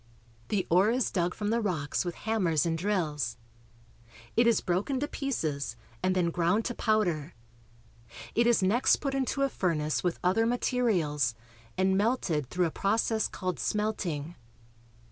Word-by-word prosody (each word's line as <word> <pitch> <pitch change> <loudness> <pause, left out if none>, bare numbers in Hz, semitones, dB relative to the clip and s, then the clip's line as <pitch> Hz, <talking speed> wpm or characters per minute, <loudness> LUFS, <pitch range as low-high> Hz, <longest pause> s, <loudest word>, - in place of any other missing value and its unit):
The 200 -4 0
ore 185 +5 +5
is 245 +1 +1
dug 180 -1 0
from 210 0 -2
the 235 +1 +1
rocks 160 -9 -1
with 175 -2 -4
hammers 180 -9 +1
and 165 -1 0
drills. 155 - -1 1.0
It 235 0 +4
is 235 - +4
broken 190 +10 -1
to 290 - -1
pieces 150 - -2 0.3
and 185 0 +1
then 175 -2 +1
ground 180 +6 +1
to 240 - -1
powder. 180 -10 0 1.0
It 235 +1 +3
is 235 -4 +3
next 225 +7 +4
put 275 -2 -3
into 270 +1 0
a - - +4
furnace 155 - -1
with 175 -2 0
other 195 +6 +3
materials, 180 - +1 0.4
and 190 0 +3
melted 195 - 0
through 180 -1 +1
a 165 - -1
process 220 +3 +1
called 185 -2 -4
smelting. 180 -8 -2
185 Hz, 150 wpm, -29 LUFS, 165-225 Hz, 1.0 s, ore